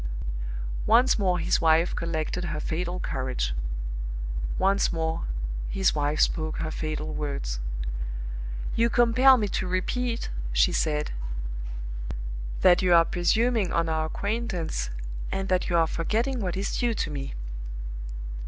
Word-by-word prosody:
Once 235 +1 +5
more 185 -3 +2
his 170 +1 +2
wife 165 +1 +4
collected 165 +1 -1
her 155 -2 -2
fatal 175 +3 -2
courage. 130 - -1 1.0
Once 195 +1 +3
more 160 -1 -1 0.4
his 190 -1 +2
wife 150 0 0
spoke 155 -1 +1
her 160 -1 -2
fatal 155 0 -3
words. 140 - -2 1.2
"You 230 +1 +4
compel 255 +3 +6
me 210 -3 +1
to 185 - -1
repeat," 230 +6 -1 0.2
she - - +4
said, 150 -1 0 1.5
"that 180 -1 +6
you 180 -2 +5
are 165 0 +7
presuming 220 +3 +2
on 170 0 +2
our 160 0 +1
acquaintance, 190 - -2 0.4
and 195 0 -2
that 185 -1 +2
you 170 - +3
are 165 - +5
forgetting 225 +11 0
what 185 -4 -2
is 195 - -1
due 240 -2 +2
to 155 - -1
me." 140 - -4
175 Hz, 130 wpm, -27 LUFS, 155-205 Hz, 1.5 s, are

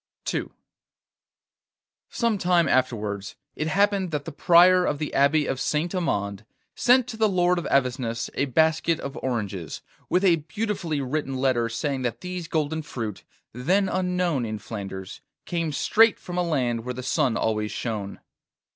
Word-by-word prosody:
II - - -1 1.6
Some 230 -4 0
time 175 -3 +3
afterwards, 105 -6 -1 0.2
it 155 - -2
happened 195 +2 +2
that 150 -3 -3
the 165 - -5
Prior 180 +4 +6
of 150 - 0
the 150 0 -4
Abbey 145 +2 +3
of 130 - -2
Saint 155 +5 -1
Amand 100 - -1 0.3
sent 250 0 +4
to 225 - -6
the 220 -1 +3
Lord 180 -1 +2
of 170 - -6
Avesnes 125 -3 0
a 140 - 0
basket 160 +4 +2
of 140 +1 -6
oranges, 100 - -3 0.3
with 185 +2 +2
a 175 -3 +5
beautifully 165 -1 -3
written 135 0 -2
letter 130 -3 +1
saying 135 +3 -2
that 125 -2 -3
these 180 -2 -5
golden 160 0 -1
fruit, 115 -9 -6 0.3
then 185 - +1
unknown 180 -7 0
in 110 -1 -3
Flanders, 95 -3 -7 0.2
came 165 -3 -2
straight 225 +9 +4
from 175 - -8
a - - +3
land 125 -9 0
where 125 +1 -4
the 130 - -6
sun 135 -3 +1
always 105 -1 -1
shone. 105 -4 -4
150 Hz, 155 wpm, -25 LUFS, 120-175 Hz, 1.6 s, Prior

